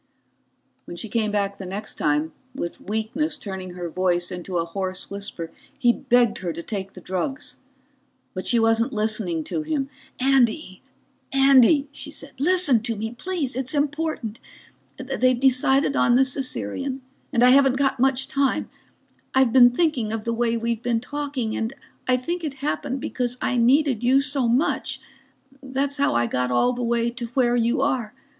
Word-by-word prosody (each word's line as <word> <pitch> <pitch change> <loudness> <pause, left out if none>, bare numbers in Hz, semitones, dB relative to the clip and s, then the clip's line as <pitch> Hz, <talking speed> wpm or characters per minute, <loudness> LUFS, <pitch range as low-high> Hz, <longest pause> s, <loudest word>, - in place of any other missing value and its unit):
When 175 - -8
she 220 - -4
came 220 -2 0
back 200 -1 -1
the 195 - -6
next 205 +3 -5
time, 150 +2 0 0.2
with 170 -10 -5
weakness 220 - -2
turning 190 -6 -7
her 175 -1 -4
voice 175 0 0
into 180 0 -4
a 165 - 0
hoarse 185 +2 -4
whisper, 200 -5 -6 0.3
he 240 -4 +4
begged 240 -2 +2
her 180 -2 -3
to 170 - -7
take 195 -1 -5
the 185 - -11
drugs. 190 +10 -3 0.8
But 185 - -5
she 240 - +3
wasn't 225 +1 +2
listening 210 -7 -1
to 315 - -3
him. 300 -3 -2 0.3
"Andy, 255 -6 +2 0.5
Andy," 275 +1 +5
she 290 - -7
said, 280 -1 -8
"listen 310 -6 +4
to 230 0 -2
me 220 +2 -4
please. 300 -1 -3
It's 260 +2 -2
important. 290 -6 -2 0.6
They've 255 -2 +1
decided 265 +2 +3
on 240 - +4
the 265 - +6
Caesarean, 260 - -3 0.3
and 235 - +3
I 250 - +7
haven't 270 -1 +5
got 270 -2 +1
much 265 +1 +2
time. 275 -2 0 0.6
I've 265 -3 +4
been 245 -2 +8
thinking 250 -5 0
of 225 -1 -3
the 230 - -1
way 230 0 0
we've 230 0 -2
been 235 -2 0
talking, 270 -3 -3
and 225 +3 -2 0.3
I 255 -1 +4
think 340 +7 -4
it 295 -4 -3
happened 275 -1 -3
because 250 -1 -2
I 255 - -1
needed 250 0 +3
you 260 +3 +5
so 275 -2 0
much. 245 +7 0 0.6
That's 275 +1 -2
how 280 - +2
I 120 0 +3
got 125 +1 -1
all 185 - +2
the 245 - -4
way 235 0 +1
to 235 0 -5
where 245 -2 +3
you 235 +1 +1
are. 250 -5 -1
245 Hz, 170 wpm, -23 LUFS, 215-270 Hz, 0.8 s, been